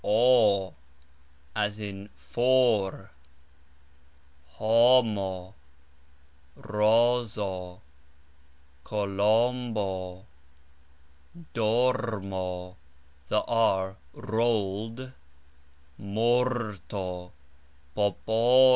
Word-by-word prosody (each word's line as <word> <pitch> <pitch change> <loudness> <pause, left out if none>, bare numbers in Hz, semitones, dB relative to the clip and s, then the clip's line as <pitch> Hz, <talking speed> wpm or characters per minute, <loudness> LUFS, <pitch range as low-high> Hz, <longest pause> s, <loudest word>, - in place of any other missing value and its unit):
o 105 -4 +3 0.8
(as 105 0 -1
in 100 -1 -7
fOr), 120 -6 +1 1.4
HO 115 +6 +5
mo, 95 -4 -4 1.0
RO 115 +4 +2
zo, 95 -5 -6 1.0
ko 105 -1 -2
LOM 115 +5 +1
bo, 95 -2 -4 1.3
DOR 115 0 +1
mo 90 -1 -5 0.5
(the 105 - +1
R 95 -5 +1 0.2
rolled), 115 +2 -2 0.9
MOR 115 +2 0
to, 90 -2 -5 0.6
po 100 +3 +1
PO 110 0 0
lo. 125 +3 +6
105 Hz, 65 wpm, -27 LUFS, 95-120 Hz, 1.4 s, lo